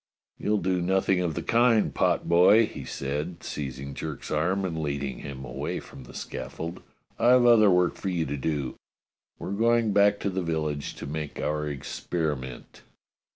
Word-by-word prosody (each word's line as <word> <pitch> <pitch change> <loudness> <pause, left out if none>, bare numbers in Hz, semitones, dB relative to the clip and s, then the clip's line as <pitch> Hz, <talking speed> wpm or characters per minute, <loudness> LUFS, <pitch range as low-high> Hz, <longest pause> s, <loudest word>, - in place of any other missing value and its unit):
"You'll 105 0 +1
do 90 -1 0
nothing 95 +1 +2
of 85 -4 -1
the - - -3
kind, 115 -2 +3
potboy," 90 +6 +4
he - - -8
said, 75 +5 -4
seizing 70 -1 -5
Jerk's 75 -1 -6
arm 90 +6 +1
and 80 -3 -3
leading 70 -3 -3
him 65 -2 -7
away - - -4
from 65 - -12
the - - -13
scaf - - -6
fold. 85 +2 -6 0.4
"I've 120 +1 +5
other 115 -4 +7
work 90 -1 +3
for 95 - -4
you 85 -3 0
to 70 - -3
do. 70 -1 -2 0.6
We're - - -6
going 115 +1 +2
back 100 0 +4
to 100 - -1
the 95 0 -1
village 75 -4 -2
to - - -7
make 75 +1 -5
our 75 0 -1
experiment." 70 -2 -4
85 Hz, 165 wpm, -27 LUFS, 75-100 Hz, 0.6 s, other